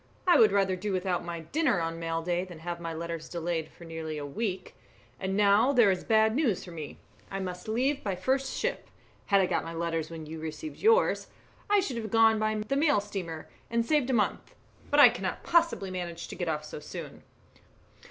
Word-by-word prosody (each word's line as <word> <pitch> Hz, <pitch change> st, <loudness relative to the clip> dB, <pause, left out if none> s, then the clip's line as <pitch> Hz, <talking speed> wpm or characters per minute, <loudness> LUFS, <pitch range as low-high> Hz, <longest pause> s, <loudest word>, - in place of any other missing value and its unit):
I 360 Hz, -, +6 dB
would 220 Hz, -, +7 dB
rather 195 Hz, -2 st, +2 dB
do 200 Hz, +3 st, -3 dB
without 185 Hz, -1 st, -1 dB
my 170 Hz, -1 st, -5 dB
dinner 255 Hz, -, +1 dB
on 165 Hz, 0 st, -3 dB
mail 165 Hz, 0 st, -2 dB
day 175 Hz, +1 st, 0 dB
than 180 Hz, -3 st, -10 dB
have 170 Hz, +1 st, -5 dB
my 165 Hz, -1 st, -4 dB
letters 165 Hz, 0 st, -5 dB
delayed 170 Hz, -2 st, -2 dB
for -, -, -15 dB
nearly 160 Hz, -1 st, -5 dB
a 145 Hz, -, -4 dB
week. 185 Hz, +4 st, -4 dB, 0.5 s
And 190 Hz, +1 st, -2 dB
now 205 Hz, +5 st, +5 dB
there 235 Hz, -6 st, +6 dB
is 185 Hz, -, -2 dB
bad 220 Hz, -1 st, +3 dB
news 255 Hz, -, +1 dB
for 180 Hz, -, -10 dB
me, 155 Hz, -3 st, -7 dB, 0.3 s
I 195 Hz, -, -4 dB
must 180 Hz, 0 st, -5 dB
leave 265 Hz, +6 st, 0 dB
by 195 Hz, -3 st, -1 dB
the 180 Hz, -, -14 dB
first 265 Hz, 0 st, 0 dB
ship. -, -, -2 dB, 0.4 s
Had 200 Hz, -1 st, +5 dB
I -, -, +3 dB
got -, -, 0 dB
my 165 Hz, 0 st, -6 dB
letters 165 Hz, -1 st, -2 dB
when 165 Hz, -1 st, -7 dB
you 160 Hz, +1 st, -7 dB
received 160 Hz, -, -6 dB
yours, 455 Hz, +3 st, +3 dB, 0.4 s
I 410 Hz, -1 st, +5 dB
should 270 Hz, -10 st, -3 dB
have 220 Hz, -2 st, -4 dB
gone 225 Hz, 0 st, +5 dB
by 215 Hz, 0 st, +1 dB
the 275 Hz, -, 0 dB
mail 290 Hz, -4 st, +3 dB
steamer 185 Hz, -6 st, -6 dB, 0.2 s
and 230 Hz, 0 st, +1 dB
saved 295 Hz, -2 st, +2 dB
a -, -, +1 dB
month, 215 Hz, -4 st, 0 dB, 0.3 s
but -, -, +3 dB
I -, -, +10 dB
cannot -, -, -4 dB
possibly 335 Hz, -, +2 dB
manage 175 Hz, -2 st, -5 dB
to -, -, -6 dB
get 175 Hz, -2 st, -2 dB
off 150 Hz, -1 st, -2 dB
so 150 Hz, -, -7 dB
soon." -, -, -8 dB
190 Hz, 215 wpm, -29 LUFS, 165-230 Hz, 0.5 s, I